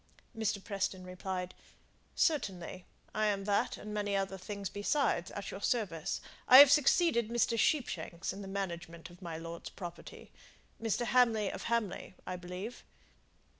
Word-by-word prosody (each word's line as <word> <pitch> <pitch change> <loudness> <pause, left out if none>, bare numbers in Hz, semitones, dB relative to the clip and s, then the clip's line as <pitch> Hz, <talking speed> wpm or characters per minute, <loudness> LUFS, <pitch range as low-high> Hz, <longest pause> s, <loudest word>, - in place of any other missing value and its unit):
Mr. 220 -1 0
Preston 195 -2 -2
replied, 185 0 -4 0.6
"Certainly. 185 - 0 0.3
I 215 0 +1
am 200 -1 0
that 205 0 +1
and 210 0 -7
many 205 -1 -1
other 195 -1 -1
things 200 +1 -5
besides, 205 - 0
at 200 -1 -6
your 195 - -7
service. 195 -9 -1 0.3
I 255 - +10
have 280 0 +11
succeeded 285 -5 +4
Mr. 235 0 +2
Sheepshanks 185 - 0
in 195 - -8
the 195 - -7
management 175 -3 -5
of 175 - -16
my 170 -3 -5
lord's 165 +1 -7
property. 175 -2 -9 0.5
Mr. 225 +1 0
Hamley 230 -5 +3
of - - -6
Hamley, 230 -6 -1
I 185 - -3
believe?" 180 +6 -7
200 Hz, 145 wpm, -33 LUFS, 180-225 Hz, 0.6 s, have